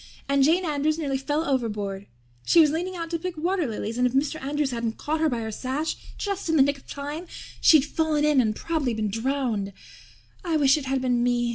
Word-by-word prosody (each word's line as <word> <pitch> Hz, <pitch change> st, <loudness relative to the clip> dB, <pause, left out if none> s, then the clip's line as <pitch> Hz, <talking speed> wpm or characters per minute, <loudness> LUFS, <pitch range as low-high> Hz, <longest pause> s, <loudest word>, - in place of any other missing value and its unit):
And 280 Hz, 0 st, +3 dB
Jane 340 Hz, +6 st, +3 dB
Andrews 305 Hz, 0 st, 0 dB
nearly 275 Hz, -4 st, -1 dB
fell 295 Hz, +4 st, -1 dB
overboard. 210 Hz, -7 st, -2 dB, 0.4 s
She 340 Hz, -, +4 dB
was 305 Hz, -3 st, +6 dB
leaning 355 Hz, +4 st, -2 dB
out 335 Hz, -1 st, -5 dB
to 335 Hz, -, -1 dB
pick 360 Hz, 0 st, -5 dB
water 345 Hz, 0 st, 0 dB
lilies 225 Hz, +1 st, -4 dB
and 250 Hz, -, +4 dB
if 245 Hz, -, -4 dB
Mr. 290 Hz, +3 st, 0 dB
Andrews 285 Hz, 0 st, -1 dB
hadn't 230 Hz, -2 st, -3 dB
caught 310 Hz, +2 st, -2 dB
her 320 Hz, 0 st, +3 dB
by 240 Hz, -4 st, -2 dB
her 220 Hz, 0 st, -4 dB
sash 265 Hz, +8 st, -2 dB, 0.2 s
just 400 Hz, -4 st, -3 dB
in 320 Hz, -, +2 dB
the 280 Hz, -, +7 dB
nick 280 Hz, 0 st, 0 dB
of -, -, -25 dB
time 295 Hz, +5 st, -6 dB, 0.3 s
she'd 305 Hz, -4 st, +6 dB
fallen 310 Hz, -1 st, 0 dB
in 295 Hz, -3 st, +4 dB
and 215 Hz, -3 st, 0 dB
prob'ly 295 Hz, -7 st, -1 dB
been 215 Hz, -2 st, -1 dB
drowned. 225 Hz, -4 st, -1 dB, 0.7 s
I 335 Hz, -3 st, +1 dB
wish 275 Hz, -2 st, +5 dB
it 300 Hz, -3 st, -4 dB
had 265 Hz, -1 st, 0 dB
been 245 Hz, -2 st, +1 dB
me. 240 Hz, -1 st, +1 dB
280 Hz, 225 wpm, -25 LUFS, 245-315 Hz, 0.7 s, the